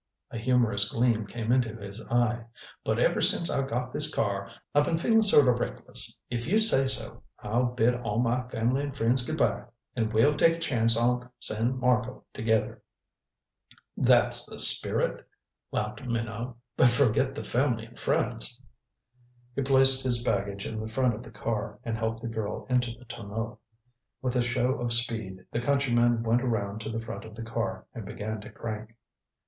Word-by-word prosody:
A - - -5
humorous 110 -4 +2
gleam 115 -3 +1
came 115 +1 -3
into 120 -3 +1
his 100 0 -8
eye. 120 -1 +1 0.4
"But - - 0
ever - - +2
since 170 - +2
I 135 -1 -1
got 125 0 -3
this 150 +1 +3
car 100 -6 -2 0.2
I 145 - +5
been 160 +3 0
feelin' 225 +6 +3
sort 175 -10 +5
o' - - +6
reckless. 120 - -2
If 120 +1 -4
you 205 +6 +3
say 215 -12 +4
so, 130 - -4 0.2
I'll 120 +4 +1
bid 125 0 +2
all 115 -3 -3
my 125 +1 0
family 125 +3 0
and 140 -1 -5
friends 120 +2 +1
good - - -4
by, - - 0 0.3
and 110 -2 -1
we'll 120 +7 +3
take 165 +2 +4
a - - -9
chance 115 -7 +2
on 125 +1 0
San 115 +4 -1
Marco 125 0 0
together." 110 0 -1 1.1
"That's - - +5
the - - -8
spirit," - - +3 0.5
laughed - - -3
Minot. 115 0 -4 0.2
"But 125 - +5
forget 130 +2 +2
the - - -5
family 120 -3 0
and 115 +1 -15
friends." - - -1 0.9
He - - -1
placed 135 0 +6
his 120 -2 0
baggage 100 -2 -1
in 110 - -4
the 110 0 -5
front 125 0 +1
of 105 - -7
the - - -12
car, 115 -1 -4
and 115 -2 -3
helped 110 0 -3
the - - -3
girl 110 -2 -4
into 125 -1 +2
the 120 +2 -13
tonneau. 110 -1 -6 0.6
With 130 -1 -2
a 125 - +3
show 125 +1 0
of 120 -1 0
speed, 110 -5 +1
the 115 - -1
countryman 120 -3 +2
went 115 +2 +2
around 110 -4 -2
to 110 - -5
the 115 0 -3
front - - -7
of 110 -1 -11
the 115 - -7
car 115 -4 -4
and 115 - -7
began 105 +2 -5
to - - -10
crank. 110 0 -7
120 Hz, 180 wpm, -28 LUFS, 110-125 Hz, 1.1 s, o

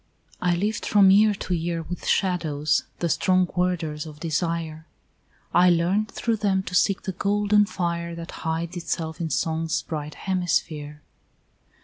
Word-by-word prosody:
I 180 -1 +2
lived 205 +5 -1
from 200 -2 +6
year 210 +1 +5
to 185 - -4
year 165 0 -2
With 175 +2 -7
shadows, 160 -6 +1
the 170 - -1
strong 185 +2 +2
warders 165 -4 -1
of 150 -1 -11
desire; 165 -1 -2 0.7
I 180 +1 +6
learned 180 +5 +2
through 230 -1 -1
them 195 -2 +1
to 180 - -8
seek 195 +2 +2
the 190 - -2
golden 205 +2 +2
fire 170 -2 -3
That 165 0 -7
hides 165 +2 -2
itself 165 -1 -3
in 165 - -2
Song's 160 +1 -1
bright 150 -2 -5
hemisphere. 155 -5 -2
175 Hz, 145 wpm, -24 LUFS, 160-190 Hz, 0.7 s, from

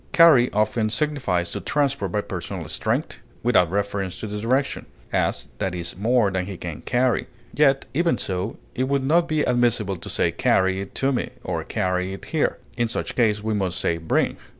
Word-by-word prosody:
Carry 155 -8 +7
often 110 +1 +1
signifies 115 - 0
to - - -3
transport 140 -2 0
by 105 - 0
personal - - -5
strength, - - -2 0.2
without 105 -8 +4
reference 100 -1 -2
to - - -5
the 105 0 -4
direction; 130 +5 0 0.3
as, - - 0
that 95 -1 -1
is 85 -1 -5
more 110 +1 +2
than 95 -1 -2
he 100 -2 -6
can 85 -4 -6
carry; 125 -3 +1 0.3
yet, 140 -2 +3
even 170 +4 +2
so, 95 +3 -3 0.2
it 130 - 0
would 140 0 0
not 165 +5 +3
be 155 -1 +1
admissible 120 -6 +1
to 85 - -9
say - - +1
carry 95 0 +2
it 100 - -9
to 135 +1 +1
me, 125 - -1
or - - -2
carry 90 0 -1
it 95 - -8
here; 160 -3 0 0.2
in 120 -1 +1
such 115 - -3
case 105 -3 +2
we 110 0 0
must 95 -4 -1
say 85 - 0
bring. 80 - 0
110 Hz, 190 wpm, -23 LUFS, 95-130 Hz, 0.3 s, Carry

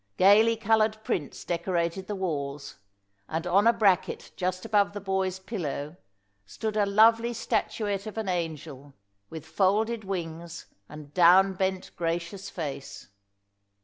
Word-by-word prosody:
Gaily 215 +4 +6
coloured 220 0 +2
prints 150 -8 -3
decorated 170 +1 -2
the 210 - -3
walls, 145 -6 -4 0.5
and 160 +2 -3
on 195 +5 +3
a - - +8
bracket 200 -6 +1
just 185 +1 -3
above 205 -2 +2
the 205 - -5
boy's 190 -1 -1
pillow 170 -7 -5 0.5
stood 215 - -5
a 205 -1 +2
lovely 225 +3 +4
statuette 210 -3 -2
of 215 - -8
an 220 -2 -3
angel, 155 -6 -4 0.3
with 160 -2 -8
folded 215 +4 +1
wings 170 -3 -6 0.2
and 150 -1 -11
down 185 +2 +6
bent 190 0 -2
gracious 170 +3 -3
face. 140 - -7
190 Hz, 130 wpm, -27 LUFS, 165-205 Hz, 0.5 s, a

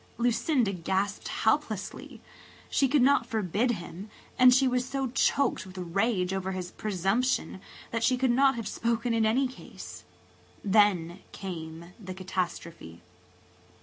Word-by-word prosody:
Lucinda 235 -1 +1
gasped 190 +3 -2
helplessly. 220 -4 -2 0.5
She 275 - +3
could 275 0 +3
not 265 -3 +4
forbid 220 +1 0
him 185 +1 -8 0.3
and 255 0 +7
she 260 +1 +4
was 250 0 +1
so 265 -1 -3
choked 270 +1 +1
with 185 0 -12
rage 185 +1 0
over 190 0 -2
his 180 -1 -5
presumption 200 +2 -1 0.3
that 230 -1 -1
she 255 +1 +3
could 255 -1 +2
not 270 +2 +4
have 230 -2 -4
spoken 235 +1 -1
in 225 -1 +3
any 260 +5 +2
case. 255 - -11 0.6
Then 195 -4 +3
came 170 -2 -7
the 185 -3 -7
catastrophe. 175 - -5
215 Hz, 135 wpm, -28 LUFS, 185-250 Hz, 0.6 s, and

